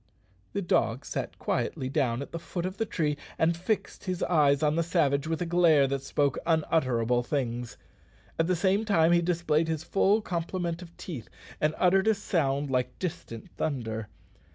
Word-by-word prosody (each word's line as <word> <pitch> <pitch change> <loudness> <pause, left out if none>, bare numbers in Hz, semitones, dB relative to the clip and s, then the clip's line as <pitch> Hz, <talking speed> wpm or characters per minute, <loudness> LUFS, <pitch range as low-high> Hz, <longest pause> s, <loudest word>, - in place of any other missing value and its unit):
_" - - -36
The 200 - -1
dog 130 -7 +1
sat - - -4
quietly 130 - -2
down 130 -1 0
at - - -12
the 170 - -4
foot 175 +1 -4
of 185 +1 -4
the 225 -1 -1
tree, 150 -6 -1 0.2
and 165 +1 +2
fixed 190 +6 -3
his 185 -2 -2
eyes 145 -4 +3
on 150 0 +3
the 170 - +2
savage 155 -4 +1
with 165 +2 -1
a - - -3
glare 165 -4 +4
that 135 0 -1
spoke 140 0 0
unutterable 130 -7 +1
things. 120 -3 -3 0.6
At 165 - +3
the 185 - +2
same 190 +4 +2
time 170 -6 +3
he 175 0 +5
displayed 165 -2 +1
his 160 -1 -2
full 200 +4 +2
complement 170 -1 -3
of 170 -1 -12
teeth, 140 - -7 0.3
and 155 +1 +2
uttered 190 +2 +3
a 220 - +5
sound 145 -8 0
like 125 -1 -1
distant 115 - -6
thunder. 115 -7 -2
160 Hz, 180 wpm, -28 LUFS, 135-175 Hz, 0.6 s, he